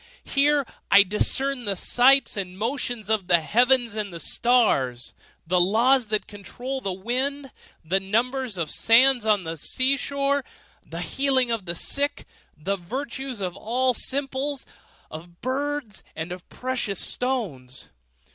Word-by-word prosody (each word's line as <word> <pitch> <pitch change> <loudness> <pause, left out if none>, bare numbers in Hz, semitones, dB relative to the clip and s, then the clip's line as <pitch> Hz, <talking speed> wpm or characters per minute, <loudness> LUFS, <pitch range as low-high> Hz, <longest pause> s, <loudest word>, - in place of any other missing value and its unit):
Here 285 0 +2 0.2
I 200 0 +8
discern 250 +6 -1
the 200 -1 0
signs 265 +8 +4
and 185 -2 -5
motions 235 -1 -3
of 215 -4 0
the 175 -2 +5
heavens 240 +6 +3
and 210 -2 -3
the 170 - -7
stars; 145 - +1 0.3
the 180 +2 +2
laws 230 +7 +3
that 215 0 0
control 245 +7 -7
the 195 - -3
winds; 260 +8 -2 0.4
the 185 +5 +1
number 235 +7 0
of 235 -6 -4
the 170 -3 -1
sands 235 - +4
on 205 -3 +3
the 165 0 -5
seashore; 275 - 0 0.4
the 165 +1 -7
healing 260 - +1
of 225 -5 -1
the 170 -1 -3
sick; 285 +10 -1 0.3
the 195 +6 -2
virtues 255 +4 -5
of 180 -2 -3
all 250 +5 0
simples, 270 +2 -2 0.5
of 170 +2 -11
birds, 270 -3 -3
and 160 +2 -5
of 180 0 -9
precious 250 -7 -2
stones. 180 - -2
230 Hz, 140 wpm, -24 LUFS, 185-265 Hz, 0.5 s, I